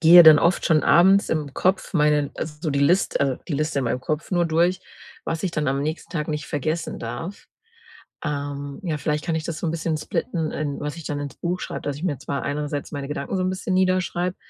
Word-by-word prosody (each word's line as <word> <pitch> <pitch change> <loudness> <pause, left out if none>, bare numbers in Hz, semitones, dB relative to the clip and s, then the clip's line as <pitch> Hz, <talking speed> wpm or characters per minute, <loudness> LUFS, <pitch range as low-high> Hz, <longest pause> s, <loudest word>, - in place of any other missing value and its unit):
gehe 170 +1 +10
dann 155 -2 +9
oft 170 +5 +2
schon 155 -3 +4
abends 190 +3 +5
im 150 -4 -2
Kopf 190 +1 0
meine 150 -2 +3
also, 155 +1 -4
die 140 - 0
Liste 175 +7 +3
also, 135 -2 +1
die 150 - -1
Liste 155 +1 0
in 130 - -2
meinem 120 +2 -1
Kopf 155 +4 -3
nur 175 -2 +2
durch, 175 +3 +2 0.4
was 165 0 -3
ich 190 - 0
dann 150 -3 -1
am 135 +1 0
nächsten 155 +3 -4
Tag 150 -3 -2
nicht 150 -3 -3
vergessen 155 +3 -2
darf. 185 +5 -6 0.8
Ähm, 140 -1 -4
ja, 160 -5 -1
vielleicht 150 +1 -1
kann 165 -3 0
ich 160 - -2
das 165 -2 -4
so - - -2
'n 160 - 0
bisschen 165 -1 -1
splitten 160 +1 -2
in 145 -2 -3
was 150 +3 -4
ich 165 - -9
dann 145 -1 -3
ins 145 -1 -6
Buch 180 +1 -2
schreibe, - - -5
dass 145 - -2
ich 155 - -9
mir 160 -7 0
zwar 140 - -3
einerseits 145 0 -3
meine 140 -2 -4
Gedanken 150 +5 -3
so 185 - 0
'n 185 - +1
bisschen 185 0 -2
niederschreibe, 185 -1 +1
155 Hz, 230 wpm, -23 LUFS, 145-175 Hz, 0.8 s, gehe